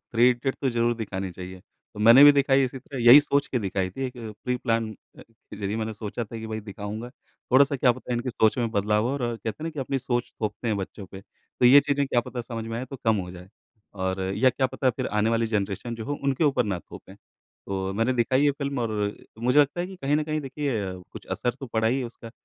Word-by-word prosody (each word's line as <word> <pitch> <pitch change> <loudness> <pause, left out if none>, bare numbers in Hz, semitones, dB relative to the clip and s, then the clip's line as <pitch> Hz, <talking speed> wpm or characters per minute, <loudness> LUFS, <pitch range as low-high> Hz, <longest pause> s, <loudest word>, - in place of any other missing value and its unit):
Three 120 +2 +6
idiot 125 +2 -1
तो 135 - +2
ज़रूर 120 0 +1
दिखानी 95 -4 -4
चाहिए। 90 +1 -9 0.3
तो 105 - -7
मैंने 115 +6 +9
भी 145 - +10
दिखाई 135 -1 +3
इसी 130 +1 -5
तरह 135 +1 -9
यही 120 +5 +10
सोच 140 0 0
के 125 - 0
दिखाई 95 -3 -2
थी 135 +8 -5
एक 125 - -7 0.3
प्री-प्लान 115 -3 0 0.3
अ, - - -12
के 115 -2 -16
ज़रिए 100 +2 -2
मैंने 110 -1 -3
सोचा 105 +2 -5
था 115 +1 -8
कि 110 - -6
भई 110 0 -4
दिखाऊँगा। 105 +3 -7
थोड़ा-सा 140 +3 +1
क्या 125 -1 +4
पता 125 - -7
है 120 - 0
इनकी 125 +2 -2
सोच 110 0 +2
में 115 -2 0
बदलाव 105 +1 +1
हो - - -1
और 140 - -3 0.2
कहते 115 - -6
हैं - - -4
ना 165 - -2
कि 150 - -11
अपनी 135 +1 -1
सोच 120 -1 -2
थोपते 110 +2 -3
हैं 105 - +1
बच्चों 95 0 -6
पे। 95 +1 -11
तो 120 +3 -3
ये 140 +3 +9
चीज़ें 140 -1 0
क्या 120 -2 +2
पता 120 +1 -6
समझ 115 -2 -6
में 115 0 -4
आएँ 130 - -5
तो 135 - -6
कम 110 -1 +3
हो 90 -2 -4
जाएँ, 90 +1 -12 0.5
और 95 0 -2 0.2
या 130 +3 +4
क्या 130 +1 0
पता 130 0 0
फिर 125 +1 -4
आने 105 +2 +1
वाली 115 0 +1
जनरेशन 105 +2 -2
जो 110 -1 -7
हो, 145 - -2
उनके 140 +2 +1
ऊपर 135 -4 +2
ना 95 -4 -2
थोपें। - - -13
तो 95 0 -7
मैंने 115 +4 +1
दिखाई 130 +2 +2
ये 145 - +5
फ़िल्म 140 -1 -4
और 115 -2 -1 0.5
मुझे 125 +5 +2
लगता 145 +4 +1
है 175 - -2
कि 190 0 -10
कहीं 145 +2 +2
न 155 - 0
कहीं 155 0 -2
अ, - - -10
देखिए 130 -8 -3 0.2
कुछ - - -10
असर 125 - 0
तो 135 - -5
पड़ा 110 -1 0
ही 130 +3 +1
है 130 - -2
उसका 115 0 -11
120 Hz, 255 wpm, -25 LUFS, 105-135 Hz, 0.5 s, भी